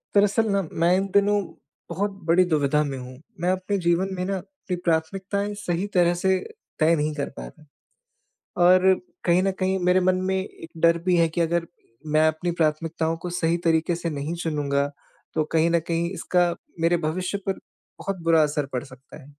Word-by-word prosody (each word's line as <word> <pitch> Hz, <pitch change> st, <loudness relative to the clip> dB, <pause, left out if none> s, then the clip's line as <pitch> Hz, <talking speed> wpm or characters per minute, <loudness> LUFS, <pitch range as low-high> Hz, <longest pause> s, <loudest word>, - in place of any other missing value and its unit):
दरअसल 205 Hz, +2 st, +3 dB
ना, 200 Hz, 0 st, +2 dB
मैं 175 Hz, +2 st, +3 dB
इन 195 Hz, +1 st, 0 dB
दिनों 205 Hz, +1 st, +4 dB, 0.5 s
बहुत 200 Hz, +4 st, -1 dB
बड़ी 175 Hz, +3 st, +5 dB
दुविधा 150 Hz, -3 st, +2 dB
में 140 Hz, -2 st, -4 dB
हूँ। 125 Hz, 0 st, -9 dB, 0.2 s
मैं 175 Hz, -, +1 dB
अपने 185 Hz, +2 st, -1 dB
जीवन 175 Hz, +3 st, +2 dB
में 180 Hz, -, -3 dB
ना, 195 Hz, 0 st, -1 dB
अपनी 190 Hz, -1 st, -6 dB
प्राथमिकताएँ 195 Hz, +5 st, -1 dB
सही 180 Hz, -1 st, -2 dB
तरह 175 Hz, -1 st, +4 dB
से 190 Hz, +2 st, +1 dB, 0.4 s
तय 160 Hz, +1 st, +4 dB
नहीं 150 Hz, 0 st, -1 dB
कर 145 Hz, -, -2 dB
रहा। -, -, -10 dB, 1.0 s
और 185 Hz, +1 st, +6 dB, 0.3 s
कहीं 175 Hz, +1 st, +4 dB
न 195 Hz, -, +2 dB
कहीं, 190 Hz, 0 st, +1 dB
मेरे 180 Hz, +1 st, +3 dB
मन 185 Hz, 0 st, +3 dB, 0.2 s
में 190 Hz, -, +1 dB
एक 190 Hz, -3 st, -6 dB
डर 170 Hz, 0 st, +5 dB
भी 180 Hz, -1 st, +4 dB
है 165 Hz, -1 st, +4 dB
कि 160 Hz, -, -3 dB
अगर 170 Hz, 0 st, +1 dB, 0.5 s
मैं 155 Hz, +1 st, +5 dB
अपनी 155 Hz, +3 st, -2 dB
प्राथमिकताओं 160 Hz, +1 st, 0 dB
को 175 Hz, +2 st, -6 dB
सही 170 Hz, -1 st, +1 dB
तरीके 165 Hz, +1 st, +2 dB
से 170 Hz, 0 st, -3 dB
नहीं 145 Hz, +3 st, -3 dB
चुनूँगा, 145 Hz, -3 st, 0 dB, 0.5 s
तो 155 Hz, -, +1 dB
कहीं 165 Hz, +1 st, +3 dB
न 170 Hz, -, +4 dB
कहीं 170 Hz, 0 st, 0 dB
इसका 180 Hz, -2 st, +1 dB, 0.3 s
मेरे 165 Hz, +1 st, +3 dB
भविष्य 180 Hz, +5 st, -2 dB
पर 195 Hz, -, -1 dB, 0.4 s
बहुत 195 Hz, -1 st, -3 dB
बुरा 165 Hz, -1 st, +4 dB
असर 150 Hz, -1 st, 0 dB
पड़ 125 Hz, -1 st, -2 dB
सकता 130 Hz, -1 st, -15 dB
है। -, -, -15 dB
170 Hz, 185 wpm, -24 LUFS, 160-185 Hz, 1.0 s, और